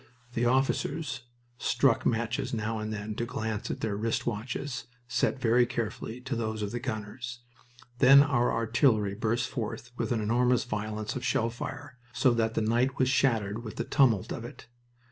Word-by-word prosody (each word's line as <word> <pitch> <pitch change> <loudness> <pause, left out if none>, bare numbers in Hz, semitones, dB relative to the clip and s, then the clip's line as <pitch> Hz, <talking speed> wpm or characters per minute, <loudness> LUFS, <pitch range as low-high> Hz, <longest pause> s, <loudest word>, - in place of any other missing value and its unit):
The 120 +1 +1
officers 130 +2 0 0.4
struck 130 -5 +2
matches 120 +3 -1
now 110 0 -2
and 110 0 -4
then 105 0 -4
to 120 - -2
glance 110 -3 -3
at - - -4
their 105 -3 -1
wrist 115 +3 -1
watches, 120 +2 -3 0.2
set 125 +3 0
very 120 0 +4
carefully 115 +1 -4
to 135 0 -3
those 110 -2 -2
of 100 - -3
the 120 - -3
gunners. 120 +1 -5 0.6
Then 140 +1 +9
our 125 -4 +2
artillery 115 -3 +2
burst 115 +4 0
forth 120 0 -5
with 115 0 -2
an 120 - +1
enormous 120 +3 +2
violence 110 -1 -3
of 130 - -4
shell 115 -4 +1
fire, 130 +2 -7
so 130 -1 +3
that 115 -1 0
the - - +1
night 120 +4 +1
was 130 -1 +2
shattered 115 -5 +1
with 110 - -7
the - - -2
tumult 120 -9 +3
of 115 - -6
it. 120 - -10
120 Hz, 175 wpm, -29 LUFS, 110-125 Hz, 0.6 s, Then